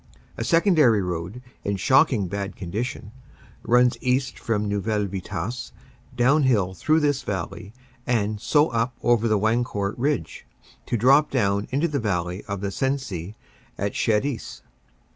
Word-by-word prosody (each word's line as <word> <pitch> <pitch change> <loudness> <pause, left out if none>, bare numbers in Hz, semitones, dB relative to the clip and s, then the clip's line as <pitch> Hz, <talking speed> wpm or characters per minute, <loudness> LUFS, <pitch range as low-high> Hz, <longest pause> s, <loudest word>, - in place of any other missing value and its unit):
A - - -3
secondary 155 - +4
road, 90 +7 -5 0.2
in 100 - -1
shocking 130 - +3
bad 100 +2 -4
condition, 105 +5 -5 0.5
runs 125 0 +3
east 130 +1 0
from 105 -2 -1
Neuville 105 +1 -1
Vitasse 100 +5 -5 0.5
downhill 125 -7 +3
through 155 +10 +2
this 145 -2 +1
valley, 100 -2 -5 0.4
and 110 -4 0
so 150 +1 +3
up 115 +1 -1
over 120 -1 +3
the 110 -1 +2
Wancourt 110 -2 0
Ridge 145 +3 -2 0.4
to 120 - 0
drop 135 +7 +5
down 100 -5 0
into 145 +6 +1
the 145 -3 -2
valley 90 -3 -2
of 100 -2 -4
the 100 -1 -2
Sensee 110 -8 -3 0.4
at 100 +1 -2
Cherisy. 115 +4 -1
115 Hz, 135 wpm, -24 LUFS, 100-130 Hz, 0.5 s, drop